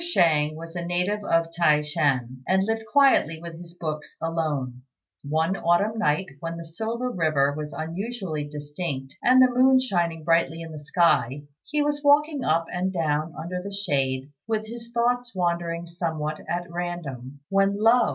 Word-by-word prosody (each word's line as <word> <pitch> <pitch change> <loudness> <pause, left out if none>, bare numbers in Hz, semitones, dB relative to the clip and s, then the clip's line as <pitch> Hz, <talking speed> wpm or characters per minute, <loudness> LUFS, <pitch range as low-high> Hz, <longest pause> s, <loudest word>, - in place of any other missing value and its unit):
Shang 160 - +2
was 165 +2 -9
a 175 - -3
native 180 +4 -1
of 165 -3 +1
T'ai 155 -3 +3
shan, 130 -4 0
and 190 +1 +3
lived 225 +1 -2
quietly 270 - +4
with 165 0 -8
his 170 0 -13
books 155 -3 -5
alone. 150 -7 -2 0.4
One 160 +5 0
autumn 200 +6 +1
night 170 -3 +2
when 165 +1 -5
the 170 - -7
Silver 225 +9 -3
River 155 - +2
was 150 0 -5
unusually 170 -2 -4
distinct 145 -2 -5
and 255 +1 +5
the 255 -1 +6
moon 260 +1 +5
shining 170 -10 -1
brightly 165 0 +2
in 165 - -8
the 155 - -7
sky, 145 -3 +2 0.3
he 300 0 +1
was 290 0 -1
walking 290 -1 +4
up 165 -2 +2
and 185 +2 -1
down 155 -2 -1
under 180 +2 -4
the 200 +2 -6
shade, 135 -8 -1 0.2
with 220 -1 -1
his 230 +1 -9
thoughts 245 0 0
wandering 170 -1 -1
somewhat 160 -3 -3
at 175 0 -1
random, 145 -7 -5
when 195 +1 +2
lo! 230 +3 +5
170 Hz, 165 wpm, -25 LUFS, 155-210 Hz, 0.4 s, the